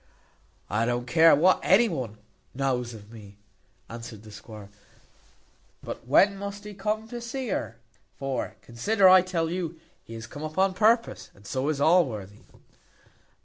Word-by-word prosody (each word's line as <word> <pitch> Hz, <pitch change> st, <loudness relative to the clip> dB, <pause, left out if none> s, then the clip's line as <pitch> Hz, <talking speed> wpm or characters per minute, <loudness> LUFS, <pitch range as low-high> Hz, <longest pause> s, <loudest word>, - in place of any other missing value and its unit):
"I 110 Hz, +3 st, 0 dB
don't 120 Hz, 0 st, -1 dB
care 160 Hz, +6 st, +6 dB
what 180 Hz, +6 st, +4 dB
anybody 180 Hz, -, +2 dB, 0.4 s
knows 125 Hz, -3 st, -1 dB
of 105 Hz, 0 st, -14 dB
me," 100 Hz, -3 st, -13 dB, 0.5 s
answered 115 Hz, -2 st, -9 dB
the 110 Hz, -, -13 dB
squire; 105 Hz, -1 st, -11 dB, 1.1 s
"but -, -, -8 dB
when 195 Hz, +9 st, +4 dB
must 200 Hz, 0 st, -6 dB
he 210 Hz, 0 st, -8 dB
come 210 Hz, +3 st, -3 dB
to 240 Hz, -1 st, -6 dB
see 250 Hz, +1 st, -5 dB
her? 115 Hz, -, -3 dB, 0.4 s
for, 135 Hz, -1 st, -4 dB
consider, 190 Hz, -, +2 dB
I 185 Hz, 0 st, +8 dB
tell 175 Hz, -3 st, -2 dB
you, 170 Hz, -2 st, -4 dB, 0.2 s
he 115 Hz, -, -10 dB
is 115 Hz, 0 st, -7 dB
come 145 Hz, +5 st, -10 dB
up 155 Hz, +1 st, -6 dB
on 190 Hz, 0 st, +3 dB
purpose, 225 Hz, +5 st, +1 dB
and 100 Hz, -, -20 dB
so 130 Hz, +6 st, -2 dB
is 150 Hz, -3 st, -1 dB
Allworthy." 125 Hz, -, +1 dB
145 Hz, 150 wpm, -26 LUFS, 115-195 Hz, 1.1 s, I